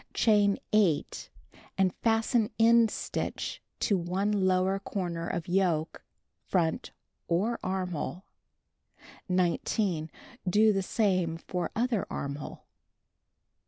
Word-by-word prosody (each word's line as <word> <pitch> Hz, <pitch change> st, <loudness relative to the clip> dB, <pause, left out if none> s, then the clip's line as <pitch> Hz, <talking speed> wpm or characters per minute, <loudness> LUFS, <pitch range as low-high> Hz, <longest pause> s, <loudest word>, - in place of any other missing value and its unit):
Chain 205 Hz, -3 st, +4 dB, 0.2 s
8 195 Hz, -8 st, +1 dB, 0.5 s
and 190 Hz, -2 st, +2 dB
fasten 225 Hz, 0 st, +1 dB
end 230 Hz, 0 st, +5 dB
stitch -, -, -4 dB, 0.2 s
to 200 Hz, -3 st, +2 dB
one 185 Hz, +4 st, -1 dB
lower 190 Hz, -1 st, +2 dB
corner 175 Hz, -4 st, -4 dB
of 170 Hz, -2 st, -3 dB
yoke, 175 Hz, -4 st, 0 dB, 0.5 s
front, 165 Hz, -4 st, 0 dB, 0.4 s
for 205 Hz, +8 st, 0 dB
armhole. 185 Hz, -1 st, -3 dB, 1.0 s
19. 180 Hz, -1 st, 0 dB, 0.4 s
Do 215 Hz, +3 st, +5 dB
the 195 Hz, -, 0 dB
same 185 Hz, -5 st, 0 dB
for 175 Hz, 0 st, -3 dB
other 235 Hz, -3 st, 0 dB
armhole. 140 Hz, +1 st, -6 dB
190 Hz, 95 wpm, -29 LUFS, 175-210 Hz, 1.0 s, end